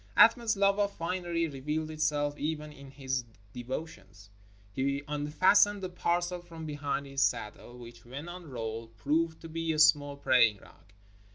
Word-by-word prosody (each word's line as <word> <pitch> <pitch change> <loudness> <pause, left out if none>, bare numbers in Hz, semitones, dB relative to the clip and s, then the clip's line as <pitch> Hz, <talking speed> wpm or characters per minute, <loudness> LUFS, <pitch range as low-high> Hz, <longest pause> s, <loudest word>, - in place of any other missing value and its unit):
Athman's 230 0 +6
love 200 +1 +3
of 200 -1 +2
finery 170 -1 -1
revealed 150 +2 -3
itself 150 -2 0
even 150 0 -3
in 140 -2 -13
his 130 -2 -3 0.3
de 120 - -6
votions. 105 -8 -7 0.4
He 140 +3 -1
unfastened 185 +8 +3
a 185 - -3
parcel 175 0 -1
from 165 -2 -10
behind 145 -2 -3
his 135 0 -3
saddle 120 +2 -1
which, 120 -1 -12
when 135 +7 -8
unrolled, 115 -10 -6
proved 160 +6 0
to 165 - -8
be 165 0 -2
a - - -3
small 145 -2 +4
praying 125 -6 +4
rug. 100 +1 -20
150 Hz, 155 wpm, -30 LUFS, 130-165 Hz, 0.4 s, Athman's